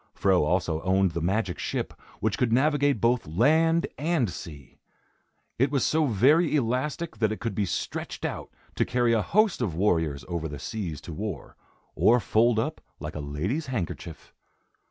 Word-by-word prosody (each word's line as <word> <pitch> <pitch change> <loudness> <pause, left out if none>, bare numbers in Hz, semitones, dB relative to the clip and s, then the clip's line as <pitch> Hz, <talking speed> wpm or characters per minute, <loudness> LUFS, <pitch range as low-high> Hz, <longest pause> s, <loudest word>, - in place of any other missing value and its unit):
Fro 95 -4 +3
also 80 0 0
owned 95 0 +2
the 85 0 -3
magic 95 -1 -1
ship, - - -3 0.3
which 110 -2 +1
could 125 -3 +1
navigate 145 0 +3
both 120 -2 +1
land 160 - +3
and 150 - +1
sea. 75 -6 -10 0.8
It 135 +3 +3
was 140 -3 +1
so 155 -1 +2
very 145 - +4
elastic 140 +5 -1
that 110 -2 +1
it 110 - -4
could 115 -3 -3
be 100 0 -1
stretched - - -4
out - - -4 0.3
to - - +3
carry 120 -1 +1
a 110 - +3
host 210 - +2
of 95 -9 -1
warriors 80 -6 0
over 85 -2 -3
the 75 -1 -7
seas 90 -6 -5
to 85 - -8
war, 100 +2 -6 0.4
or 120 +2 +4
fold 115 +2 +2
up 110 - -2 0.2
like 75 +1 -6
a - - -5
lady's 85 - -3
handkerchief. 90 - -5
110 Hz, 170 wpm, -27 LUFS, 85-130 Hz, 0.8 s, very